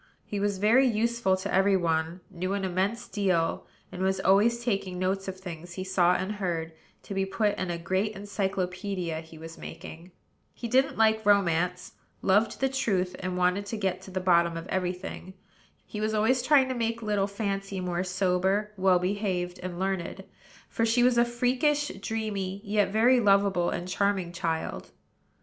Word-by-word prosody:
He 205 - -4
was 200 -1 0
very 230 +7 +4
useful 230 -3 +1
to 190 - -4
every 195 +1 +4
one; 165 0 -1
knew 185 +1 -3
an 200 -1 -1
immense 190 +5 -1
deal; 185 -5 0 0.2
and 180 - -6
was 190 0 +1
always 225 +5 +3
taking 195 -5 -1
notes 190 +1 -1
of 190 0 -5
things 175 -2 -8
he 185 - -4
saw 180 -1 +3
and 190 +2 -2
heard, 170 -4 -2 0.3
to - - -7
be 195 0 0
put 205 +2 0
in 185 - -2
a 170 - -2
great 190 +5 -1
encyclopædia 190 -3 -3
he 160 0 -14
was 165 +1 -10
making. 165 +3 -9 0.5
He 235 - -5
didn't 260 +3 +2
like 220 0 +3
romance, 180 -3 +2 0.3
loved 205 +4 +2
the 270 - +4
truth, 195 -9 -1
and 185 -1 -3
wanted 180 +3 +1
to 225 - -4
get 190 -3 -1
to - - -11
the 185 0 -3
bottom 170 -2 +3
of 165 +2 -7
every 180 -1 0
thing. 185 0 -8 0.5
He 210 - -6
was 215 0 0
always 225 +4 +3
trying 265 0 +4
to - - 0
make 230 -1 -2
little 205 -2 +1
Fancy 200 -1 -3
more 180 -1 -2
sober, 190 +2 0
well 190 -1 +4
behaved, 180 -1 -2
and 180 -1 -5
learned; 190 -2 -3 0.4
for 230 - -2
she 230 +2 +3
was 245 -1 +4
a 235 - +5
freakish, 255 +5 +1
dreamy, 200 -3 -3
yet 205 0 +1
very 235 +5 +4
lovable 195 -4 +3
and 175 - -4
charming 190 -2 0
child. 165 -2 -3
195 Hz, 175 wpm, -28 LUFS, 180-215 Hz, 0.5 s, a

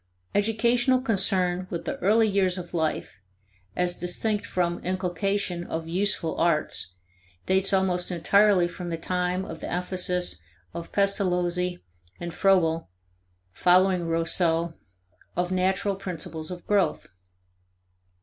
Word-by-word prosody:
Educational 235 +5 +2
concern 190 -6 +1
with 170 -2 -5
the - - -3
early 220 +4 +4
years 195 -2 +1
of 175 -1 -7
life 160 - -2 0.6
as 180 0 0
distinct 205 +4 -2
from 175 -1 -1
inculcation 185 0 -1
of 160 -1 -5
useful 180 -1 0
arts 155 - +1 0.5
dates 190 +1 +2
almost 185 -2 +1
entirely 185 +1 +4
from 175 0 -7
the 165 - -2
time 180 +2 -1
of - - -8
the - - -6
emphasis 180 - -1 0.3
by - - -4
Pestalozzi 180 -3 0 0.4
and 170 -1 -5
Froebel, 170 -3 +2 0.6
following 180 - +3
Rousseau, 165 0 +1 0.6
of 180 +1 -1
natural 190 +2 +1
principles 165 -4 -6
of 180 -1 -8
growth. 200 -3 +1
180 Hz, 115 wpm, -26 LUFS, 175-195 Hz, 0.6 s, early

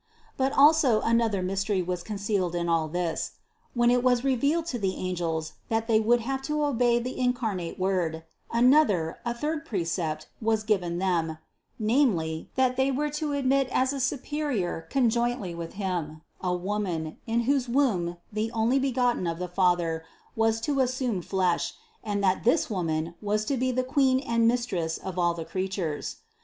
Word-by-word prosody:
But 265 0 +1
also 280 -6 +5
another 225 -4 +1
mystery 195 +1 0
was 180 0 -3
con 210 +1 -5
cealed 195 -4 -1
in 170 0 -1
all 165 -2 +2
this: 170 0 -2 0.4
When 240 0 +4
it 245 0 +3
was 250 -1 +2
revealed 280 +5 +1
to 245 - -2
the 190 -2 -1
angels 165 -3 -2 0.2
that 225 0 0
they 220 -2 +4
would 235 +2 +3
have 265 +3 -2
to 300 0 +1
obey 245 -4 +2
the 250 +2 -4
incarnate 225 -9 -1
Word, 180 -4 -1 0.3
an 240 +2 +5
THE 295 - +7
CONCEPTION - - +9
91 - - +8
other, 165 - -1
a 235 - 0
third 300 +4 -2
precept 165 - -2
was 220 -1 +1
given 185 -6 0
them, 170 -4 0 0.4
namely, 210 - +1
that 255 -1 +2
they 265 +1 +3
were 290 +3 -1
to 300 0 -2
admit 275 -1 +2
as 260 +2 +2
a 275 - -3
superior 260 - -2
conjointly 240 -6 +1
with 170 -1 -6
Him, 175 -6 -3 0.2
a 180 - 0
Woman, 180 -4 -3
in 230 +1 +1
whose 260 0 +1
womb 200 -10 +1 0.2
the 215 +1 -1
Onlybegotten 245 -2 +1
of 165 - -6
the 180 +1 -3
Father 175 -3 +1 0.3
was 225 0 +2
to 280 +2 0
assume 255 -6 0
flesh 185 -1 0 0.3
and 205 -2 -2
that 190 -1 +2
this 245 +1 +2
Woman 165 -3 -1
was 210 +1 0
to 275 - 0
be 255 0 0
the 255 +1 0
Queen 260 -1 +3
and 230 -4 +1
Mistress 200 -10 0
of 185 -1 -5
all 175 -1 +2
the 165 -1 -5
creatures. 185 -5 -3
220 Hz, 175 wpm, -27 LUFS, 175-255 Hz, 0.4 s, CONCEPTION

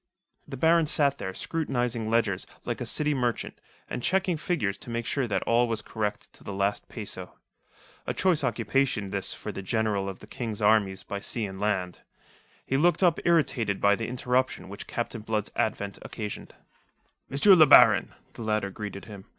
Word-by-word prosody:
The 135 - -7
Baron 165 +3 +4
sat 140 -2 +2
there 95 - -4
scrutinizing 120 -3 -2
ledgers, 110 -5 +1 0.2
like - - -3
a - - -1
city 150 0 +2
merchant, 125 -4 -2 0.3
and - - -4
checking 185 +3 +1
figures 150 - -2
to - - -9
make 115 0 -3
sure 135 0 -1
that 105 - -1
all 120 +1 +3
was 115 -2 -2
correct 105 -2 -4
to - - -16
the - - -6
last 100 +1 -1
peso. - - -5 0.7
A - - 0
choice 180 -6 +2
occupation 115 -3 0
this 100 -1 -2
for - - -6
the - - -6
General 100 0 0
of 95 - -7
the - - -13
King's 115 -5 -5
Armies 105 -3 +2
by 100 -2 -5
Sea 110 +2 -2
and 95 -1 -7
Land. 95 -4 -1 0.6
He 135 - 0
looked 170 +4 +3
up 175 -3 +4
irritated 130 - +2
by 100 0 +4
the 115 - -4
interruption 125 -2 -1
which 100 +2 -8
Captain 120 -1 -4
Blood's 105 -1 -2
advent 100 -2 -2
occasioned. 105 -3 -7 0.7
"M. 135 - -4 0.2
le 160 -4 +8
Baron," 125 -6 +7 0.2
the - - -10
latter 110 -3 -1
greeted 100 -1 -7
him. 100 -3 -10
115 Hz, 180 wpm, -27 LUFS, 100-135 Hz, 0.7 s, le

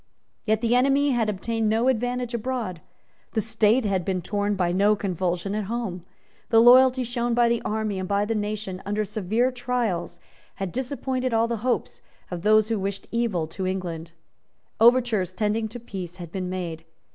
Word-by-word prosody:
Yet 220 0 +1
the 235 0 +2
enemy 275 +3 +3
had 230 -4 +1
obtained 225 +2 -1
no 225 +3 +2
advantage 245 0 0
abroad; 235 -7 -3 0.5
the 220 - +1
State 220 +2 +2
had 190 -3 0
been 185 +1 -1
torn 205 +2 -1
by 180 -2 +1
no 200 +4 +3
convulsion 185 -1 -2
at 210 -1 -2
home; 205 -5 -4 0.5
the 225 - +5
loyalty 255 +2 +7
shown 240 0 -1
by 240 0 +4
the 235 0 +1
army 215 -2 -2
and 185 - -4
by 200 0 +2
the 225 - -1
nation 205 -3 -3
under 210 +1 -1
severe 220 +6 0
trials 245 -8 -2 0.4
had 195 -2 -4
disappointed 255 - -2
all 225 +1 +3
the 235 0 -2
hopes 245 +3 -2 0.3
of 175 -1 -4
those 215 +2 +4
who 225 -2 0
wished 195 0 -4
evil 230 -8 0
to 185 +2 -4
England. 175 -3 -4 0.7
Overtures 230 -5 +4
tending 215 +3 0
to 235 +3 -8
peace 185 -6 -7
had 175 -3 -9
been 185 -1 -3
made. 170 -3 -4
215 Hz, 175 wpm, -25 LUFS, 190-240 Hz, 0.7 s, loyalty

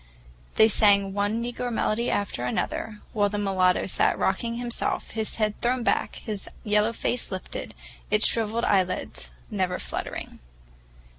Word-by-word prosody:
They 220 - +7
sang 200 -3 +4
one 205 +3 0
negro 245 +1 -3
melody 230 +1 0
after 200 -12 -1
another, 210 - -2
while 205 -2 +2
the 205 - -3
mulatto 190 -3 +2
sat - - +2
rocking 230 +5 0
himself, 240 0 -3
his 220 -1 -2
head 215 -1 -1
thrown 245 +1 +1
back, - - +1
his 210 -3 -6
yellow 210 +1 +3
face 240 +1 -2
lifted, 185 -2 -6 0.3
its 210 +1 +3
shriveled 225 +1 +1
eyelids 185 - 0 0.2
never - - 0
fluttering. - - -5
210 Hz, 140 wpm, -26 LUFS, 200-230 Hz, 0.3 s, They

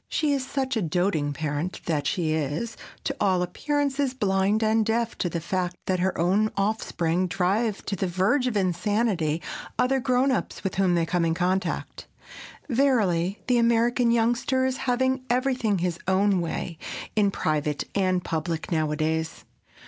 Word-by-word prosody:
She 300 -2 +1
is 275 -2 0
such 265 -1 -2
a 220 - +1
doting 165 -3 0
parent 150 +4 -3
that 150 -4 0
she 160 -4 0
is, 155 - -2 0.3
to - - -2
all 185 -3 +2
appearances, 280 +6 -1
blind 200 -1 +1
and 220 +1 +3
deaf 230 +1 0
to 175 - 0
the 170 - -2
fact 180 +1 -2
that 185 -1 0
her 185 +1 0
own 195 +6 +2
offspring 185 -4 0
drive 195 +5 0
to 200 - -2
the 190 - -1
verge 190 +10 +1
of 230 -4 0
insanity 185 -3 0 0.3
other 265 +1 +2
"grown 255 +1 +2
ups" 255 - -2
with 190 - -2
whom 190 -2 +2
they 170 -1 +2
come 175 +1 0
in 165 0 +1
contact. 185 +2 -2 0.6
Verily 210 - +1
the 250 -2 +3
American 235 +1 +3
youngster 240 +3 +2
is 260 0 -1
having 260 +1 +1
everything 250 -4 +1
his 175 -1 -2
own 190 0 +3
way 165 0 -4 0.4
in 210 -2 +4
private 150 -5 -1
and 185 -2 +1
public 165 +1 -3
nowadays! 160 0 -1
195 Hz, 155 wpm, -26 LUFS, 170-235 Hz, 0.6 s, in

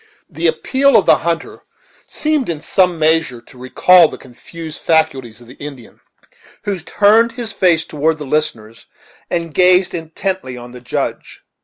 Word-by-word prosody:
The - - -2
appeal 275 - +2
of 200 - +2
the - - +5
hunter 165 -1 -4 0.5
seemed 305 - -1
in 165 -3 -3
some 180 +2 +1
measure 160 -5 +1
to 120 - -18
recall 170 +7 +5
the - - -9
confused 155 +5 -11
faculties 135 -8 0
of 120 - -16
the 125 - -13
Indian, 140 -5 -10 0.6
who 200 -3 -3
turned 215 +7 +3
his 230 -2 -5
face 170 -5 +2
toward 155 +1 -1
the 150 - -7
listeners 115 -7 -3 0.4
and 170 -2 -3
gazed 180 +2 +4
intently 165 -4 -4
on 120 0 -10
the 125 0 -12
Judge. 125 - -5
160 Hz, 155 wpm, -17 LUFS, 135-185 Hz, 0.6 s, the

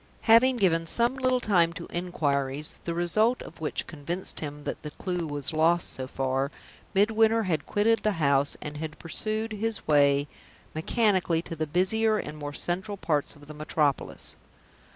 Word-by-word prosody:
Having 245 +3 +5
given 165 -6 +2
some 235 +7 +3
little 255 -1 +1
time 175 -7 +3
to - - -7
inquiries, 145 -5 -1
the 170 - -2
result 215 +8 +2
of - - -13
which 155 - -2
convinced 170 +4 -4
him 145 -1 -6
that - - -4
the 150 - -6
clew 180 +1 -3
was 145 +1 -4
lost 165 +2 +3
so 130 0 -4
far, 135 +1 -1 0.5
Midwinter 220 +2 +4
had 160 -6 -1
quitted 225 +2 +2
the 215 - +1
house, 140 -4 +2
and 150 0 -6
had 155 0 -5
pursued 215 +6 -2
his 220 +1 -3
way 145 -1 +4 0.5
mechanically 180 -1 +1
to 165 - -6
the 155 0 -2
busier 215 +7 +2
and 150 - -5
more 145 -1 -5
central 190 +7 -3
parts 150 -6 -1
of 145 0 -15
the 155 - -10
metropolis. 150 -1 -1
170 Hz, 165 wpm, -27 LUFS, 150-215 Hz, 0.5 s, Having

